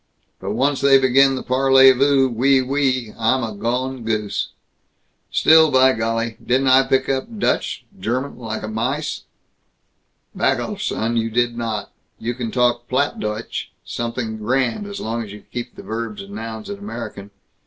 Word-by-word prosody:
But 100 - -4
once 135 +3 +1
they 140 -1 +6
begin 135 +1 +4
the 130 - -5
parlez 135 0 +5
vous, 135 0 +4
oui, 130 +3 +3
oui, 130 -3 0
I'm 125 +3 +2
a 110 -2 -4
gone 125 +4 -2
goose. 110 -2 -2 0.8
Still, 160 0 +6
by 130 -1 +5
golly, 115 0 -2
didn't 130 +2 +2
I 130 +1 +5
pick 130 0 +2
up 135 - -2
Dutch - - -1
German 125 +6 -3
like 110 -2 -5
a - - -4
mice? 125 +8 -3 1.1
Back - - +1
off, - - -5
son! 115 +1 -1
You 115 0 0
did 120 +1 0
not! 115 -3 -4 0.3
You 120 +2 -3
can 120 -2 -4
talk 120 0 +1
Plattdeutsch 115 -5 -2 0.2
something 115 -1 -4
grand, 130 - 0
as 200 0 -6
long 115 +1 -3
as 105 -3 -7
you 105 0 -11
keep 120 0 -5
the - - -10
verbs 110 -2 -5
and 100 - -13
nouns 110 +1 -6
in 200 -1 -6
American. 115 - -7
120 Hz, 165 wpm, -21 LUFS, 115-135 Hz, 1.1 s, they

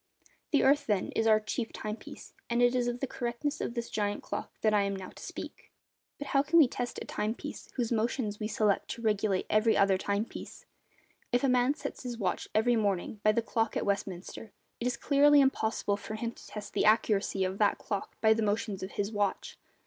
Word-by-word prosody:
The 285 - +3
earth, 280 +2 +4
then, 205 -4 +1
is 225 - +1
our 215 -1 +6
'chief 220 +2 -3
time 215 0 -4
piece,' - - -12 0.2
and 235 0 +1
it 245 0 +4
is 245 -1 +1
of 245 0 -3
the - - +1
correctness 250 +4 -3
of 235 - -3
this 235 -1 -3
giant 205 -1 -2
clock - - -5
that 215 -1 +3
I 205 - +4
am 200 0 -1
now 190 -1 -7
to - - -14
speak. - - -8 0.5
But 285 - -6
how 275 - +4
can 305 +4 +2
we 310 -5 +8
test 245 0 -4
a - - -6
time 215 +2 -2
piece 295 +3 -8
whose 240 -3 -1
motions 220 -2 -1
we 215 - -2
select 215 -2 +1
to 230 - -11
regulate 210 -3 +1
every 215 +1 +3
other 195 -1 +4
time 200 +2 0
piece? - - -10 0.7
If 245 +1 +2
a 270 - +3
man 250 +3 +3
sets - - -6
his 245 -2 -5
watch 190 -5 -2
every 240 +3 +4
morning 205 -1 -1
by 215 - +5
the 230 +2 0
clock 225 -1 0
at - - -1
Westminster, 200 +1 -3 0.3
it 240 - -1
is 245 -1 -1
clearly 290 +3 +5
impossible 220 -6 +1
for 215 +1 -6
him 230 +1 -3
to - - -15
test 210 -1 -8
the - - +1
accuracy 210 -3 +3
of 190 +1 -2
that 205 -1 +3
clock 200 -2 -5
by 220 0 +6
the 225 - -1
motions 210 -1 -1
of 190 - -6
his 205 +1 -2
watch. 205 -2 -2
220 Hz, 225 wpm, -30 LUFS, 205-245 Hz, 0.7 s, we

